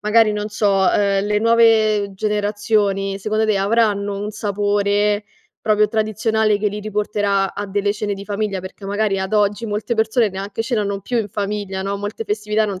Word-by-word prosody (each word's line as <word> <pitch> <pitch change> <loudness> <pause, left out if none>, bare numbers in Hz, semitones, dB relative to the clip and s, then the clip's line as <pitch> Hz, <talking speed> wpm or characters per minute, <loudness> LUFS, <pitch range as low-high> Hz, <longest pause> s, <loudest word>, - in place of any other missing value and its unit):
magari 215 0 +4
non 210 0 -3
so, 210 -1 0
uhm, 195 +1 +2
le 210 0 +1
nuove 220 -3 +3
generazioni, 205 -1 0
secondo 215 +2 0
te 215 -2 +2
avranno 205 -1 +1
un 205 +1 -4
sapore 205 0 0 0.4
proprio 210 -1 +3
tradizionale 220 0 +1
che 210 0 +1
li 210 +1 -6
riporterà 205 -2 0
a 205 0 -5
delle 205 +1 0
cene 205 -1 -3
di 200 0 -8
famiglia? 205 -2 -2
Perchè 190 +2 -9
magari 205 -1 0
ad 190 +2 -2
oggi 210 +2 +1
molte 210 +3 -3
persone 220 0 +2
neanche 195 +3 -4
ce 240 +2 -2
l'hanno 200 -2 -1
più 240 +4 -1
in 210 -2 -2
famiglia, 200 -1 -3
no, 200 +1 -3
molte 205 +2 -5
festività 210 +1 0
non 195 -3 -4
205 Hz, 180 wpm, -20 LUFS, 200-215 Hz, 0.4 s, magari